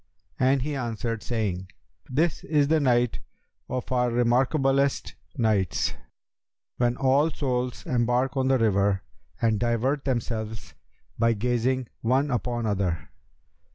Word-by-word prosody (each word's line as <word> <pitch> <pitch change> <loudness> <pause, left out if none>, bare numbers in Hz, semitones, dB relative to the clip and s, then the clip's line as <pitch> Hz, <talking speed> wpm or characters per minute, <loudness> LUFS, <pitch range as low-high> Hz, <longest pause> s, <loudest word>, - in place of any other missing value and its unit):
and 130 0 +3
he 150 +1 -2
answered, 115 -3 -3
saying, 100 -6 -2 0.4
'This 155 +5 0
is 150 -3 +2
the 160 0 +4
night 120 -4 +2 0.5
of 130 0 -4
our 125 -1 +2
remarkablest 135 +3 +2 0.2
nights, 105 -6 +1 0.8
when 120 0 +1
all 135 +4 +3
souls 125 -5 -2
embark 125 +2 +1
on 130 -1 +1
the 135 0 +4
river 100 -3 +2 0.4
and 110 -3 +2
divert 120 +5 0
themselves 110 -4 -3 0.5
by 115 0 +4
gazing 125 +3 0
one 135 +5 +2
upon 120 0 -1
other. 95 -5 -1
125 Hz, 120 wpm, -26 LUFS, 115-135 Hz, 0.8 s, the